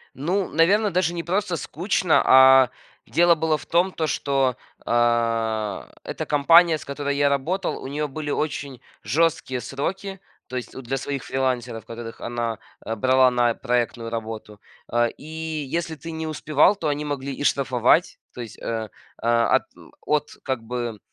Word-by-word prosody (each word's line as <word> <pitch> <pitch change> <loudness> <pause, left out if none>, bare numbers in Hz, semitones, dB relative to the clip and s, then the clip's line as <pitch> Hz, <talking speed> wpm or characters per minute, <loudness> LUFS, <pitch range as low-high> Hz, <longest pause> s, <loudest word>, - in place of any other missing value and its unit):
Ну, 180 +7 -1
наверно, 200 +7 +3
даже 175 -1 +1
не 170 -1 -4
просто 185 0 -1
скучно, 175 +4 +1
а 130 -1 +7 0.4
дело 170 0 +4
было 160 -1 +1
в - - -12
том, 175 +3 +2
то, 160 -3 -2
что, 135 -4 0 0.3
а, 115 -3 0 0.2
эта - - -5
компания, 165 +3 +5
с - - -12
которой 140 0 -3
я 145 0 +3
работал, 170 +8 -1
у - - -5
нее 150 +2 -2
были 145 +1 -6
очень 140 -4 -3 0.2
жесткие 145 -1 0
сроки, 190 - -4 0.3
то 130 - -8
есть 125 - -5
у 130 - -6
для 135 +2 -3
своих 140 0 -4
фрилансеров, 125 -3 -2
которых 115 0 -8
она, 120 -1 -3 0.3
э, 115 - -2
брала 130 +3 +4
на 120 -1 +2
проектную 120 -1 -1
работу. 110 -2 -6 0.3
Э, 120 0 +3
и 160 -1 -5
если 170 -1 -2
ты 160 +3 -9
не 160 0 -4
успевал, 155 +4 +3
то 165 -6 -3
они 150 +1 -1
могли 140 -1 -3
и 145 - -5
штрафовать- 135 +4 +2 0.2
то 125 - -7
есть, 115 -2 -9
э, 110 -1 -3 0.3
э, - - -1 0.2
от - - +3 0.4
от 150 0 +1
как 130 -4 -2
бы, 120 -2 -4
140 Hz, 165 wpm, -23 LUFS, 120-160 Hz, 0.4 s, а